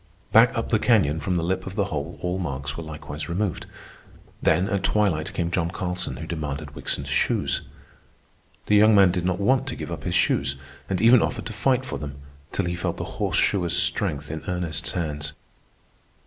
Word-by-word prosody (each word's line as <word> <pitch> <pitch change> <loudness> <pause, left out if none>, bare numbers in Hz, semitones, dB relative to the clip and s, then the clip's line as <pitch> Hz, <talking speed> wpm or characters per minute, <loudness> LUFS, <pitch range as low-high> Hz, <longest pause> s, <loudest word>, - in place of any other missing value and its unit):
Back - - +6
up - - -2
the - - +3
canyon 75 +3 +3
from 90 +4 -1
the 85 - 0
lip 95 +3 -1
of 95 - -6
the 100 -2 +1
hole 70 -2 -4
all 90 +1 -1
marks 70 -5 -3
were 85 - -5
likewise 75 0 -7
removed. 90 0 -2 0.7
Then, 85 +4 +3
at 100 -3 0
twilight, 95 -7 +1
came 85 -1 -1
John 85 -2 0
Carlson, 90 -6 -3
who 80 - -6
demanded 75 -3 -4
Wickson's - - -3
shoes. - - +1 1.0
The 105 - +3
young 105 +1 +6
man 95 -3 +6
did 90 -1 -2
not 90 0 0
want 130 +6 +2
to 120 - -3
give - - -6
up 80 -4 -5
his 90 -1 -1
shoes, 70 -5 +2 0.3
and 95 -2 0
even 115 +2 +7
offered - - -2
to 115 - -5
fight 130 +4 +1
for 130 - -4
them, 70 -1 -6 0.4
till 100 - -1
he 85 - -1
felt 90 - -2
the - - -7
horseshoer's 90 -4 +2
strength 75 0 0
in 80 -1 -5
Ernest's 90 -3 -2
hands. 75 -3 -3
85 Hz, 190 wpm, -25 LUFS, 75-100 Hz, 1.0 s, even